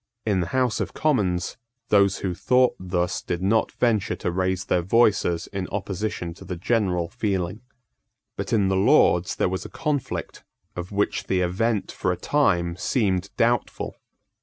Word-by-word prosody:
In 100 -4 +2
the 85 - -1
House 130 -3 0
of - - -3
Commons, 95 - 0 0.3
those 100 -2 +4
who 90 - 0
thought 125 +7 +3
thus 90 -1 -1
did 90 +1 -3
not 110 +3 +2
venture 110 -5 +1
to - - -2
raise 95 +1 -1
their 90 - +1
voices 95 -4 +2
in 95 -2 -3
opposition 100 -3 -3
to - - -13
the 90 0 -5
general 90 -2 0
feeling. 100 -1 -2 0.7
But - - -4
in 105 -4 +3
the 95 - +1
Lords 95 -1 +4
there - - +1
was 95 +1 -3
a - - -8
conflict 145 -4 -3 0.3
of 90 +2 -6
which 100 0 0
the 95 -1 +1
event 100 +4 0
for - - -1
a - - -2
time 85 -1 +1
seemed 100 -3 0
doubtful. 120 +1 0
95 Hz, 160 wpm, -24 LUFS, 90-110 Hz, 0.7 s, those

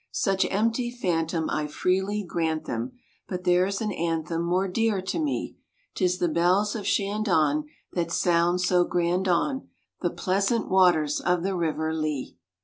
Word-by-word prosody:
Such 195 -2 +1
empty 230 +4 0
phantom 165 -8 -1
I 150 -1 -1
freely 190 +6 0
grant 160 -2 -1
them; 120 0 -4 0.3
But 180 -1 -4
there's 185 +3 +2
an 215 -1 -1
anthem 165 -1 -2
more 180 +3 +1
dear 220 +1 +1
to 190 - -3
me; 300 -3 -2 0.4
'Tis 180 -1 +1
the 175 - +1
bells 180 +6 +2
of 205 -3 -4
Shandon 205 - +1 0.3
that 170 -2 -1
sound 175 +1 +2
so 180 -1 +3
grand 175 +2 0
on 265 - 0 0.3
The - - +1
pleasant 200 +5 0
waters 175 -6 +3
of 180 -1 0
the 195 0 -1
River 160 -2 -1
Lee. 155 -4 -3
180 Hz, 150 wpm, -26 LUFS, 165-200 Hz, 0.4 s, so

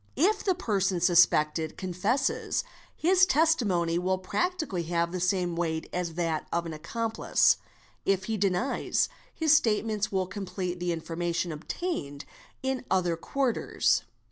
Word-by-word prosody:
— - - -34 0.2
If 430 - -6
the 375 -3 +2
person 195 - 0
suspected 160 -3 +3
confesses, 190 +9 0 0.3
his 370 +3 +4
testimony 205 - +2
will 185 +1 0
practically 315 - -2
have 170 -1 0
the 185 - -3
same 180 -1 0
weight 160 -2 -2
as 175 -2 -2
that 165 -3 -1
of 170 0 0
an 165 - -5
accomplice; 225 +9 +1 0.5
if 195 -1 +1
he 220 +3 -2
denies, 195 +5 0 0.2
his 315 -2 +3
statements 215 -4 +1
will 190 -1 0
complete 185 -2 -4
the 175 0 -1
information 170 +1 -2
obtained 150 - -4 0.4
in 265 -1 -1
other 180 -3 +2
quarters. 250 +8 0
185 Hz, 135 wpm, -28 LUFS, 170-225 Hz, 0.5 s, his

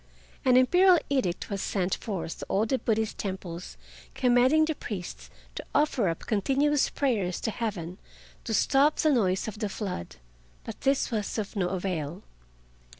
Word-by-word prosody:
An 255 -1 +5
Imperial 360 +8 +6
Edict 225 -9 -1
was 200 -1 -2
sent 190 -2 -1
forth 190 -6 -4
to - - -6
all 205 +3 +2
the 260 +3 0
Buddhist 220 -2 -1
temples 180 -3 -5 0.4
commanding 255 +5 +4
the 315 - -1
priests 195 - -7 0.2
to - - -6
offer 285 -8 +2
up 165 - -5
continuous 275 +7 +2
prayers 210 -10 -1
to 225 - -1
Heaven 195 -6 -4 0.5
to 225 - -2
stop 280 +8 +3
the 310 - +2
noise 190 -8 +1
of 215 -1 -6
the 210 -2 -1
flood. 190 - -5 0.5
But - - -8
this 270 -1 +1
was 215 -2 -2
of 215 -1 -4
no 190 -3 +1
avail. 180 -1 -3
215 Hz, 155 wpm, -28 LUFS, 185-265 Hz, 0.5 s, Imperial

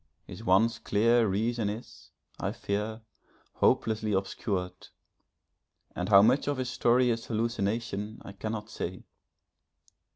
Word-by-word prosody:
His - - -10
once 110 +5 +3
clear 115 +2 +3
reason 110 +2 0
is, 110 +4 -9 0.3
I - - -2
fear, 105 +3 -3 0.6
hopelessly 110 -1 +2
obscured, 95 -1 -3 1.1
and 90 +2 -3
how 100 -1 +8
much 125 +7 +3
of 145 -1 0
his 130 -1 -2
story 125 0 +3
is 115 0 -3
hallucination, 110 -1 -2
I - - -7
cannot 110 +2 -5
say. 90 +2 -5
110 Hz, 120 wpm, -29 LUFS, 100-115 Hz, 1.1 s, how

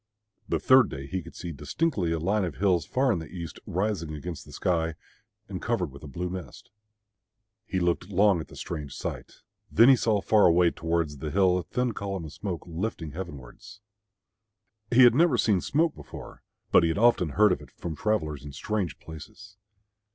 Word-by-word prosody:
The - - +1
third 130 -3 +5
day 70 0 -6
he 95 +6 -3
could 85 0 -13
see 85 - -6
distinctly 90 - -1
a 85 - 0
line 100 +6 0
of 90 - -3
hills 90 -6 +1
far 130 0 +2
in 95 - 0
the 80 - -8
east, 85 -2 -7
rising 90 -5 -2
against 85 +2 -7
the - - -12
sky, 80 -2 0 0.5
and - - -6
covered - - -1
with 70 - -12
a 75 - -9
blue 85 +6 -4
mist. 95 -2 -8 1.0
He 95 - -1
looked 90 +1 0
long 100 -1 +4
at 80 - -6
the - - -14
strange 75 -5 -6
sight. - - -6 0.3
Then 115 +4 +7
he 135 - +8
saw 110 -3 +1
far 105 +1 +4
away 85 0 +4
towards 80 -3 -2
the 75 - -4
hill 95 +2 +3
a - - -5
thin 125 +8 -1
column 100 -5 -4
of 75 - -9
smoke 95 -5 -5
lifting 85 -2 -4
heavenwards. 85 - -9 1.1
He 125 +2 +6
had 120 - +8
never 155 -1 +4
seen 105 -6 +2
smoke 160 +3 +1
before, - - -11 0.3
but - - +7
he 85 - +2
had 80 - -1
often 105 -9 +3
heard 105 -1 +6
of 90 - -1
it - - -13
from 85 -3 -6
travellers 75 -7 -1
in 70 -1 -9
strange 95 +1 -2
places. 95 +6 -12
90 Hz, 195 wpm, -27 LUFS, 80-105 Hz, 1.1 s, he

